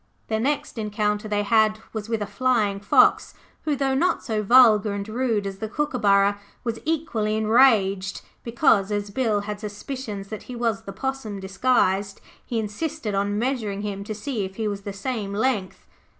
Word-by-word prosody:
The 220 0 0
next 270 -1 -1
encounter 210 0 -1
they 205 -1 0
had 215 0 +3 0.2
was 220 0 -5
with 225 -2 -1
a - - -3
Flying 210 -1 +1
fox 200 - +3 0.3
who, 300 -2 +1
though 270 -1 0
not 340 +7 +1
so 220 -4 -1
vulgar 215 -2 +6
and 200 0 -4
rude 225 -2 -1
as 195 -1 -5
the 220 - -4
Kookaburra, 205 -8 +2 0.2
was 230 -1 -3
equally 240 -10 -1
enraged 215 -4 +3 0.2
because, 230 -4 +2
as 205 0 -2
Bill 220 -3 +1
had 205 0 -5
suspicions 210 -1 -6
that 215 - -6
he 250 - -5
was 230 -4 -1
the 195 - -6
Possum 250 -3 -4
disguised, 195 -1 +1 0.2
he 235 - -4
insisted 225 +3 -3
on 200 +1 0
measuring 220 -5 -2
him 200 -1 -4
to 215 - -5
see 225 -1 -3
if 190 0 -6
he 220 0 -2
was 200 -1 -3
the 200 - -5
same 200 -1 -4
length. 215 -4 -1
215 Hz, 175 wpm, -24 LUFS, 200-245 Hz, 0.3 s, vulgar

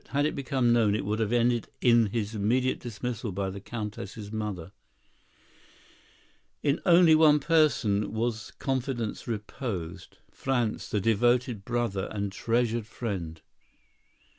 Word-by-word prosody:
Had 145 +2 +1
it 155 - 0
become 130 -3 +1
known, 110 -3 +3
it 105 - -2
would 105 +2 -1
have 110 -1 0
ended 120 -1 +2
in 120 -2 +5
his 105 0 -3
immediate 120 +5 +1
dismissal 120 -1 -4
by 95 +1 -2
the 100 - -7
Countess' 105 -1 -6
mother. 105 -6 -4 1.9
In 145 +1 +2
only 170 -2 +7
one 155 -1 +6
person 140 -10 +2
was 110 0 -2
confidence 130 -4 -2
reposed, 105 - -5
Franz, 125 -5 -1
the 105 - 0
devoted 115 +1 +2
brother 115 -5 -1
and 100 -2 -3
treasured 115 +1 0
friend. 95 -9 -5
115 Hz, 125 wpm, -28 LUFS, 105-125 Hz, 1.9 s, only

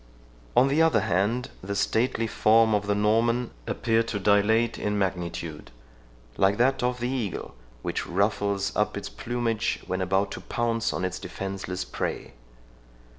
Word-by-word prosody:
On 130 - +7
the 145 +4 +2
other 165 0 +4
hand, 105 +8 0
the 100 +2 -4
stately 115 +3 +1
form 110 0 +4
of 105 -1 0
the 100 - +2
Norman 115 +3 +2 0.2
appeared 115 -1 +1
to 105 - -2
dilate 105 +3 +3
in 105 0 -1
magnitude, 85 -5 -3 0.7
like 100 +1 +3
that 130 +3 +2
of 125 0 0
the 120 - -1
eagle, 120 -8 -3 0.3
which - - -2
ruffles 100 +1 0
up 105 -1 0
its 100 - -5
plumage 115 -2 -2
when 95 0 -2
about 95 +2 +1
to - - -6
pounce 115 -2 -1
on 95 - -2
its 95 0 -3
defenceless 95 -1 -5
prey. - - -4
105 Hz, 150 wpm, -26 LUFS, 95-115 Hz, 0.7 s, On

